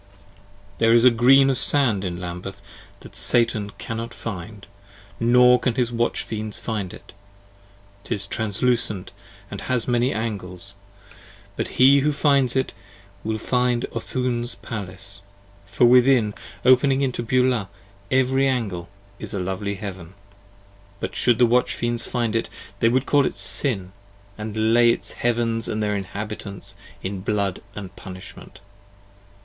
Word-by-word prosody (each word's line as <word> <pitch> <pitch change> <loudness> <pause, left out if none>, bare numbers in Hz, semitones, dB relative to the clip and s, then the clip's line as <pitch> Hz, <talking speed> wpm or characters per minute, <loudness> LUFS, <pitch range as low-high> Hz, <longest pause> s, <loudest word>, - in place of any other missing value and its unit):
15 100 0 -27 0.5
There 115 0 +4
is 120 +1 +5
a 125 - +8
Green 135 +4 +5
of 130 - -1
Sand 120 -9 +5
in 90 -2 -4
Lambeth 90 +2 -7 0.4
that - - -13
Satan 115 -4 +3
cannot 115 +1 -5
find, 105 0 -7 0.5
Nor 125 +1 +5
can 120 -1 -1
his 125 -2 0
Watch 120 0 -1
Fiends 110 -1 -5
find 105 -5 -4
it; - - -13 0.9
'tis 100 -1 -3
translucent 110 -1 -1 0.3
& - - -26
has 125 -3 -2
many 120 +1 +1
Angles, 100 -6 -5 0.8
But - - -2
he 135 +2 +7
who 150 +2 +1
finds 140 -4 +3
it 130 - 0 0.5
will 110 0 -2
find 125 +1 0
Oothoon's 120 0 -2
palace, 100 -3 -5 0.5
for 110 +5 +2
within, 125 -3 +5 0.3
Opening 130 +2 +4
into 130 -3 -1
Beulah, 125 -4 +1 0.4
every 130 +1 +2
angle 105 -10 -2 0.3
is - - -6
a - - -2
lovely 95 +2 -3
heaven. 95 -3 -8 0.8
But - - -4
should 120 -2 +2
the 120 - +5
Watch 125 +2 +2
Fiends 120 -1 -2
find 120 -3 -1
it, 115 - -1 0.3
they 115 - +4
would 130 +3 +1
call 145 -1 +3
it - - -6
Sin, 100 -10 +2 0.5
20 110 0 -5
And 110 +1 +2
lay 120 0 +5
its 115 - -1
Heavens 115 -1 -1
& - - -3
their 105 -1 -1
inhabitants 100 +1 -6 0.3
in 95 0 -4
blood 100 -2 -1
of 100 -3 -8
punishment. 95 0 -11
115 Hz, 145 wpm, -23 LUFS, 100-125 Hz, 0.9 s, a